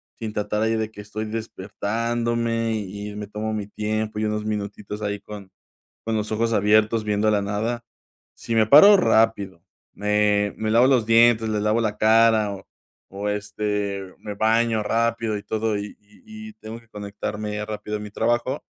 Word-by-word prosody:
sin 110 -2 -6
tratar 105 0 -2
ahí 110 0 +1
de 110 0 -2
que 105 - -10
estoy 105 +1 -5
despertándome 115 +2 -2
y 105 0 -5
y - - -10
me 105 0 -6
tomo 105 +1 -4
mi 105 -2 -3
tiempo, 105 0 -3
y 110 - 0
unos 105 0 -2
minutitos 105 0 -5
ahí 105 -1 -2
con 100 -1 -10 0.6
con 115 0 -1
los 105 0 -3
ojos 115 +1 0
abiertos 110 +2 +3
viendo 105 0 +1
la 105 - +2
nada. 110 +4 -2 0.5
Si 115 - -5
me 110 -1 +4
paro 200 - +9
rápido, 105 - +1 0.3
me 105 0 +1
me 110 - -2
lavo 115 +3 +5
los 125 -5 +3
dientes, 115 -1 +5
le 105 -1 0
lavo 105 +2 +1
la 105 -1 -1
cara 110 -1 +4
o 95 -1 -11 0.5
o, 100 +1 -4
este, 105 -2 -3
me 105 -1 -7
baño 110 +1 +2
rápido 115 0 0
y 100 - -8
todo 110 +1 -1
y 100 0 -7
y 220 - -12
y - - -13
tengo 110 - -9
que 115 - -24
conectarme 105 0 -5
rápido 105 0 -5
a - - -9
mi 105 0 -7
trabajo. 120 +5 -1
110 Hz, 180 wpm, -23 LUFS, 105-115 Hz, 0.6 s, paro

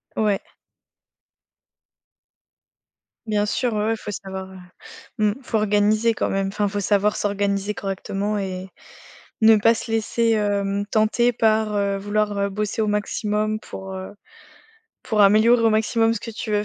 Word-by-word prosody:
Ouais. 210 -3 +1 2.9
Bien 210 -1 +1
sûr, 240 +2 -1
ouais 210 0 0
ouais, 225 +1 +1
faut 210 -1 -7
savoir, 190 -1 -7
heu, 190 - -11 0.6
mmh 210 -1 +2
faut 225 - -1
organiser 215 +2 +2
quand - - -2
même. 195 0 -1
Enfin, 205 +1 -1
faut 205 +1 -3
savoir 205 +1 +1
s'organiser 200 0 -1
correctement 195 +1 -3
et 190 -1 -5 0.7
ne 220 0 +7
pas 225 +3 +4
se 225 0 -6
laisser, 230 +1 0
hem, 205 -1 0
tenter 220 +3 +2
par, 220 -1 +2
heu, 200 -1 0
vouloir, 205 +1 -1
heu, 200 0 0
bosser 210 +3 -2
au 215 - 0
maximum 210 +1 -1
pour, 190 -2 -9
heu, 190 +2 -7 0.9
pour 215 -2 0
améliorer 215 +4 +5
au 225 - +4
maximum 225 +1 +2
ce 205 - -5
que 230 - -7
tu 220 0 -6
veux 210 0 +1
210 Hz, 150 wpm, -22 LUFS, 200-220 Hz, 2.9 s, ne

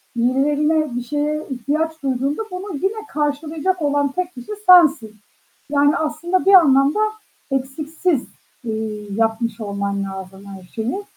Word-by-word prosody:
birilerine, 285 +3 +1
bir 245 - -2
şeye 300 +3 -2
ihtiyaç 300 +5 -2
duyduğunda 270 - -1
bunu 365 0 -5
yine 430 +3 -2
karşılayacak 310 +4 -2
olan 285 -1 +1
tek 365 +4 -3
kişi 245 - -9 0.2
sensin. 290 -12 +6 0.5
Yani 290 0 +3
aslında 335 +4 -1
bir 395 - +5
anlamda 285 0 +6 0.5
eksiksiz, 290 +3 -1 0.4
eee, 220 -2 -4
yapmış 225 0 -1
olman 200 -1 -2
lazım 190 0 -8
her 195 -2 -10
şeyi 230 - -4
285 Hz, 125 wpm, -20 LUFS, 230-320 Hz, 0.5 s, sensin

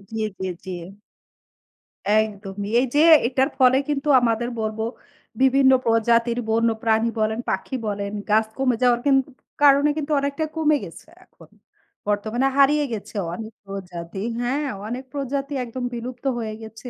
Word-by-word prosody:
জি, 220 - -1 0.2
জি, 190 - -3 0.2
জি। 190 - -9 1.4
একদমই। 205 -2 -1
এই - - +1
যে - - +5 0.3
এটার 265 +2 +1
ফলে 260 0 +6
কিন্তু 290 0 -2
আমাদের 235 0 0
বলবো 220 0 -2 0.6
বিভিন্ন 265 0 +5
প্রজাতির 230 +1 +2
বন্যপ্রাণী 225 0 +1
বলেন, 220 +1 0
পাখি 265 - -2
বলেন 200 0 -3 0.2
গাছ 215 +1 +4
কমে 255 -3 +2
যাওয়ার 240 -1 +4
কিন 275 -1 +5 0.5
কারণে 285 +1 +6
কিন্তু 305 0 -3
অনেকটা 280 +3 -2
কমে 305 -1 +3
গেছে - - -11 0.2
এখন। - - -19 0.6
বর্তমানে 215 +5 0
হারিয়ে 290 +1 +4
গেছে 210 0 -7 0.2
অনেক 220 +2 -7
প্রজাতি 185 -2 -7 0.2
হ্যাঁ 275 +4 -1 0.2
অনেক 250 +3 -4
প্রজাতি 280 +1 -3
একদম 245 +2 -6
বিলুপ্ত 245 +3 -7
হয়ে 215 -1 -4
গেছে। 225 +3 -9
235 Hz, 140 wpm, -23 LUFS, 220-270 Hz, 1.4 s, ফলে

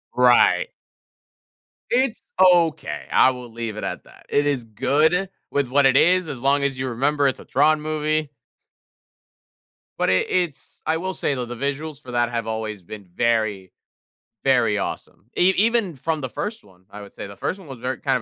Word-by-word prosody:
Right. 125 - +4 1.2
It's 250 -1 +1 0.2
okay, 175 -4 +3
I - - +6
will 125 -2 -9
leave 115 -2 -5
it - - -5
at - - -4
that, - - -19
it 145 - +2
is 140 -4 0
good 155 - +1 0.2
with 140 -3 0
what 140 +1 +3
it 135 0 +4
is, 180 +2 +4
as 135 -5 -6
long 140 +1 +2
as 140 -2 0
you 130 0 -2
remember 140 +4 +1
it's 130 - -1
a - - -12
Tron 150 +2 +3
movie 155 -1 -1 1.7
But - - +1
it 95 - +2
it's 175 -6 -2
I 160 +1 +1
will 185 +2 -3
say 150 - -1
though, 125 -1 -3
the 120 +1 -7
visuals 140 +3 -3
for 125 - -10
that 120 0 +1
have 115 -2 -3
always 110 -3 -4
been 100 +2 -10
very, 105 -1 -1 0.7
very - - +3
awesome. 100 - -6
E 185 +2 +4
even 220 -6 +2
from 155 +3 -2
the 130 - -4
first 215 - -5
one, 95 -2 -22
I 105 - -9
would 100 - -13
say, - - -7
the 100 0 -11
first 190 - -3
one 175 -7 -14
was 135 - -8
ver 130 +1 -2
kind 135 -3 0
140 Hz, 190 wpm, -22 LUFS, 120-155 Hz, 1.7 s, I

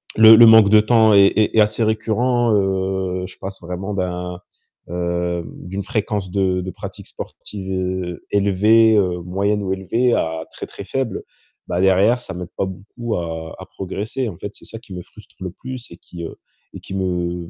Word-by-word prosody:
le 110 0 +9
le 120 +1 +9
manque 110 -2 +8
de 110 +1 +7
temps 110 0 +4
est 100 -1 +6
est 110 +1 +2
assez 105 +2 +1
récurrent, 115 +2 +1
heu, 95 -1 -1
je 95 - -13
passe 95 0 -8
vraiment 90 +4 -5
d'un 90 -2 -3 0.5
heu, 85 0 -2
d'une 95 +2 -6
fréquence 105 -3 -2
de 95 -1 +1
de 95 +1 -5
pratique - - -9
sportive 95 -2 -8
heu, 90 -2 -3
élevée, 105 +3 +4
heu, 90 -3 +1
moyenne 100 +4 -1
ou 95 -1 -3
élevée 115 +6 0
à 80 0 -1
très, - - -7
très - - -9
faible. 120 +4 -3 0.4
Bah, 85 - -1
derrière, 95 +6 +4
ça - - -8
m'aide 90 -1 -7
pas - - 0
beaucoup 105 +5 -5
à 80 -1 -5
à - - -8
progresser, 105 +7 -4
en 90 - -9
fait, 105 - -5
c'est - - -16
ça 115 - -9
qui 100 - -13
me 90 - -5
frustre - - -18
le 90 - -4
plus 130 +5 -8
et 85 - -11
qui, 85 -1 -10
heu 85 - -7 0.4
et - - -8
qui 95 - -8
me 90 -2 -2
95 Hz, 190 wpm, -20 LUFS, 90-110 Hz, 0.5 s, le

